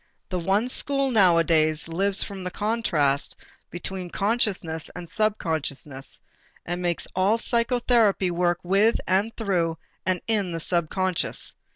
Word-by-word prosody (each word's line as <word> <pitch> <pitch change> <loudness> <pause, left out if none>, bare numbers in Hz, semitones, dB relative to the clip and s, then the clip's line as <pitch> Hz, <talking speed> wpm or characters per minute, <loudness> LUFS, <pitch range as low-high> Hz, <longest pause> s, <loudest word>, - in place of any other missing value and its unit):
The 185 -3 -2
one 195 +7 +1
school 275 +1 +3
nowadays 165 -7 +3
lives 195 +4 +2
from 195 -2 -7
the 180 - -3
contrast 175 -10 0 0.3
between 180 +1 -5
consciousness 195 -7 -1
and 175 -1 -7
subconsciousness 160 -10 -2 0.5
and 175 +1 -3
makes 175 -1 -1
all 195 +4 +3
psychotherapy 235 -5 +2
work 175 0 +1
with 200 +5 +3
and 195 +4 +1
through 175 -7 0 0.3
and 185 -1 0
in 205 -6 0
the 165 - -3
subconscious. 175 +2 -1
185 Hz, 120 wpm, -25 LUFS, 170-215 Hz, 0.5 s, school